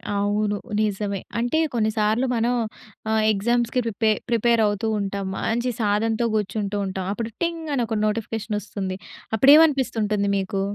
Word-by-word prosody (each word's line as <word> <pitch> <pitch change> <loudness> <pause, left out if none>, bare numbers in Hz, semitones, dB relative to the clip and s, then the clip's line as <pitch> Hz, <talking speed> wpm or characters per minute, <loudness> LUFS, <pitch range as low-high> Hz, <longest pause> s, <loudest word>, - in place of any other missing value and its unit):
అవును. 205 +1 0 0.2
నిజమే. 205 -1 -1 0.2
అంటే 245 +7 +1
కొన్ని 220 -2 +1
సార్లు 215 +4 +2
మనం 235 +2 +1 0.6
ఆహ్, 220 0 +2
ఎగ్జామ్స్‌కి 235 +4 +1
ప్రిపే 220 0 +1 0.2
ప్రిపేరవుతూ 225 -2 +2
ఉంటాం. 200 0 -3
మంచి 240 +2 -1
సాధనతో 220 +2 +1
గూర్చుంటూ 205 0 -2
ఉంటాం. 190 -1 -4
అప్పుడు 230 +1 -4
టింగ్ 335 -2 -3
అని 245 - +1
ఒక 220 -1 -2
నోటిఫికేషనొస్తుంది. 210 -3 -3 0.4
అప్పుడు 265 +6 +6
ఏమనిపిస్తుంటుంది 225 -10 +2
మీకు? 195 0 -2
215 Hz, 130 wpm, -23 LUFS, 205-235 Hz, 0.6 s, అప్పుడు